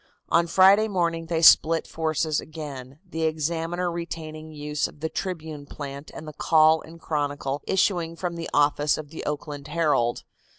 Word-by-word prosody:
On 170 Hz, 0 st, +3 dB
Friday 195 Hz, +5 st, +6 dB
morning 170 Hz, -4 st, -1 dB
they 165 Hz, 0 st, -1 dB
split 165 Hz, 0 st, +6 dB
forces 155 Hz, -1 st, -1 dB
again, 140 Hz, -4 st, -8 dB
the 165 Hz, -2 st, -5 dB
Examiner 165 Hz, +3 st, -1 dB
retaining 160 Hz, -2 st, -6 dB
the 155 Hz, -, -12 dB
use 150 Hz, 0 st, -2 dB
of -, -, -16 dB
the 160 Hz, +1 st, -2 dB
Tribune 160 Hz, -4 st, -5 dB
plant 140 Hz, 0 st, -8 dB
and 155 Hz, -, -8 dB
the 155 Hz, -, -7 dB
Call 155 Hz, +1 st, +4 dB
and 165 Hz, +1 st, -13 dB
Chronicle 145 Hz, -3 st, -2 dB
issuing 175 Hz, -4 st, +1 dB
from 175 Hz, 0 st, -4 dB
the 165 Hz, -1 st, -5 dB
office 145 Hz, 0 st, +2 dB
of 150 Hz, -1 st, -8 dB
the 160 Hz, -, -7 dB
Oakland 145 Hz, -1 st, -5 dB
Herald. 150 Hz, -7 st, +1 dB
160 Hz, 165 wpm, -25 LUFS, 150-170 Hz, -, Friday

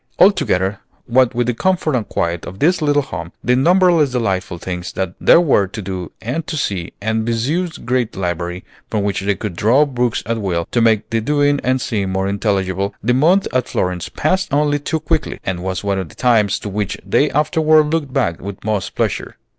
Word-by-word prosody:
Altogether, 105 Hz, -, +3 dB, 0.3 s
what 125 Hz, 0 st, +3 dB
with 120 Hz, 0 st, +1 dB
the 125 Hz, -, 0 dB
comfort 175 Hz, +3 st, 0 dB
and 115 Hz, -5 st, -2 dB
quiet 85 Hz, 0 st, -1 dB
of 95 Hz, -, -8 dB
this 170 Hz, -, +2 dB
little 145 Hz, -1 st, +2 dB
home, 85 Hz, -8 st, -7 dB
the 125 Hz, -, +3 dB
numberless 170 Hz, +1 st, +4 dB
delightful 95 Hz, -8 st, -1 dB
things 90 Hz, 0 st, -5 dB
that 95 Hz, -1 st, -3 dB
there -, -, +7 dB
were 135 Hz, -, +3 dB
to 110 Hz, -, -8 dB
do 95 Hz, -4 st, -5 dB
and 145 Hz, +9 st, -3 dB
to 155 Hz, -, -3 dB
see, 95 Hz, -10 st, -2 dB
and 110 Hz, +2 st, -1 dB
Viessieux's 145 Hz, +10 st, -1 dB
great 120 Hz, -2 st, -1 dB
library, 90 Hz, 0 st, -3 dB, 0.2 s
from 105 Hz, -2 st, -1 dB
which 100 Hz, -1 st, -1 dB
they 100 Hz, +1 st, 0 dB
could 105 Hz, -4 st, -5 dB
draw 125 Hz, -, +4 dB
books 125 Hz, -4 st, -1 dB
at 115 Hz, 0 st, -2 dB
will 85 Hz, -4 st, -1 dB
to 120 Hz, -, +2 dB
make 110 Hz, -2 st, +3 dB
the 115 Hz, 0 st, +1 dB
doing 145 Hz, +3 st, +2 dB
and 130 Hz, +1 st, +1 dB
seeing 105 Hz, -6 st, -2 dB
more 95 Hz, 0 st, -1 dB
intelligible, 100 Hz, -1 st, -1 dB
the 120 Hz, +3 st, +2 dB
month 170 Hz, +9 st, +3 dB
at 130 Hz, -1 st, 0 dB
Florence 90 Hz, -1 st, -2 dB
passed 190 Hz, -2 st, 0 dB
only 145 Hz, +1 st, +2 dB
too 160 Hz, +3 st, -2 dB
quickly, 155 Hz, -, -2 dB
and 90 Hz, -2 st, -3 dB
was 95 Hz, 0 st, -3 dB
one 100 Hz, -1 st, 0 dB
of 95 Hz, -4 st, -5 dB
the -, -, -16 dB
times 110 Hz, -5 st, +2 dB
to -, -, -7 dB
which 100 Hz, -1 st, -2 dB
they 140 Hz, +9 st, +2 dB
afterward 155 Hz, +1 st, +3 dB
looked 150 Hz, -5 st, -1 dB
back 85 Hz, -8 st, 0 dB
with 100 Hz, 0 st, -7 dB
most 105 Hz, -2 st, -2 dB
pleasure. -, -, -2 dB
115 Hz, 200 wpm, -18 LUFS, 95-145 Hz, 0.3 s, there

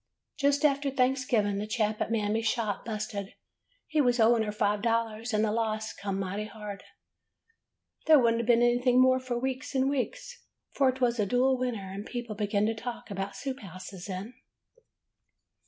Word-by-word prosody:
''Just 285 Hz, +1 st, +3 dB
after 280 Hz, -1 st, +2 dB
Thanksgiving 255 Hz, -6 st, +1 dB
the 210 Hz, -, -3 dB
chap 215 Hz, -1 st, -1 dB
at -, -, 0 dB
Mam 210 Hz, -2 st, 0 dB
my's 225 Hz, 0 st, 0 dB
shop 220 Hz, -4 st, -1 dB
busted. 210 Hz, -3 st, -4 dB, 0.5 s
He 310 Hz, -1 st, +1 dB
was 245 Hz, -2 st, +2 dB
owing 230 Hz, +1 st, +5 dB
her 215 Hz, -1 st, -1 dB
five 205 Hz, 0 st, 0 dB
dol 230 Hz, 0 st, +2 dB
lars, 225 Hz, +2 st, -7 dB
and 215 Hz, 0 st, +2 dB
the 210 Hz, -, 0 dB
loss 220 Hz, -1 st, -1 dB
come 195 Hz, -1 st, -4 dB
mighty 200 Hz, +2 st, -3 dB
hard. 210 Hz, -1 st, -8 dB, 1.2 s
There 315 Hz, -1 st, +8 dB
would 235 Hz, -4 st, +4 dB
n't 230 Hz, 0 st, -2 dB
be 240 Hz, -, +6 dB
anything 245 Hz, +1 st, +3 dB
more 255 Hz, 0 st, +5 dB
for 255 Hz, -2 st, -3 dB
weeks 260 Hz, +3 st, -3 dB
and 265 Hz, 0 st, +3 dB
weeks, 485 Hz, -, -3 dB, 0.3 s
for 270 Hz, -2 st, +3 dB
't 260 Hz, +1 st, -12 dB
was 240 Hz, -1 st, -1 dB
a 205 Hz, -, +2 dB
dull 255 Hz, +4 st, +3 dB
winter, 245 Hz, -6 st, -3 dB
and 195 Hz, +2 st, -6 dB
people 240 Hz, -1 st, -5 dB
began 205 Hz, 0 st, 0 dB
to 225 Hz, -, +1 dB
talk 230 Hz, 0 st, -7 dB
about 195 Hz, 0 st, -4 dB
soup 270 Hz, -1 st, -4 dB
houses 185 Hz, -1 st, -9 dB
then. 195 Hz, +5 st, -5 dB
230 Hz, 185 wpm, -29 LUFS, 210-255 Hz, 1.2 s, There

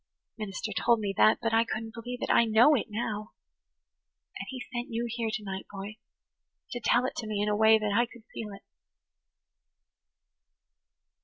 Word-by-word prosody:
The 215 Hz, -, -4 dB
minister 195 Hz, +3 st, -4 dB
told 235 Hz, +3 st, +3 dB
me 200 Hz, -2 st, -2 dB
that 215 Hz, -, +6 dB
but 225 Hz, 0 st, 0 dB
I 225 Hz, 0 st, +5 dB
couldn't 225 Hz, -1 st, -5 dB
believe 245 Hz, +2 st, -6 dB
it. -, -, 0 dB
I 235 Hz, -, +5 dB
know 230 Hz, +7 st, +6 dB
it 260 Hz, -, +1 dB
now. 215 Hz, -1 st, -4 dB, 1.1 s
And -, -, -6 dB
He 265 Hz, -, -6 dB
sent 240 Hz, 0 st, -3 dB
you 230 Hz, +1 st, -2 dB
here 230 Hz, -1 st, -2 dB
to 215 Hz, -, -3 dB
night, 190 Hz, -1 st, -5 dB
boy, 200 Hz, +2 st, -7 dB, 0.7 s
to 245 Hz, -, -3 dB
tell 245 Hz, +1 st, +3 dB
it -, -, -3 dB
to 225 Hz, -, -4 dB
me 210 Hz, -1 st, -2 dB
in 205 Hz, -, +1 dB
a 210 Hz, -, +2 dB
way 220 Hz, +1 st, +6 dB
that 210 Hz, -2 st, -1 dB
I 235 Hz, +3 st, +3 dB
could 235 Hz, -1 st, -15 dB
feel 215 Hz, -2 st, -5 dB
it." 195 Hz, 0 st, -11 dB
220 Hz, 185 wpm, -29 LUFS, 210-235 Hz, 1.1 s, that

